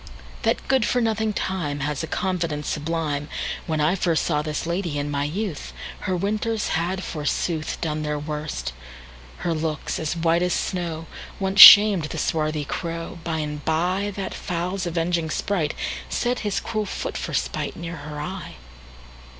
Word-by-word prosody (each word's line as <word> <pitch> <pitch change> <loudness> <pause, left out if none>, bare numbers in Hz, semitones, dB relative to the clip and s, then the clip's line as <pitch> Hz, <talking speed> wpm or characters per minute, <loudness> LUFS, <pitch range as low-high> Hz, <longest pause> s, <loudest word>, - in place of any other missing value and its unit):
That - - 0
good 265 -3 +3
for 245 +4 +2
nothing 220 -2 +1
TimeHas 150 -8 -2
a 160 - -3
confidence 170 -5 -2
sublime! 150 -2 -2 0.4
When 155 -1 0
I 150 +4 +3
firstSaw 165 -4 +1
this 150 0 -3
lady, 170 -3 -2
in 145 0 -2
my 145 0 0
youth, 180 +1 -4 0.3
Her 185 -2 -1
winters 215 +3 -1
had, 180 +3 -1
forsooth, 155 +1 -2
Done 155 -2 -1
their 150 0 -1
worst. 150 - -4 0.7
Her 170 - +2
locks, 155 -1 -2
as 160 +1 -2
white 165 +1 +2
as 180 0 +1
snow, 170 -3 -2 0.3
Once 195 0 +4
sham'd 205 -5 +11
the 155 - -5
swarthy 155 -1 0
crow:By 165 0 -4
and 150 -1 -4
byThat 190 +5 -1
fowl's 180 +1 -3
avenging 170 0 0
spriteSet 200 +8 -1
his 205 -2 -1
cruel 215 -2 -3
foot - - -4
for 60 -1 -4
spiteNear 165 - -3
her 150 +1 -7
eye. 180 +3 -6
165 Hz, 140 wpm, -24 LUFS, 150-190 Hz, 0.7 s, sham'd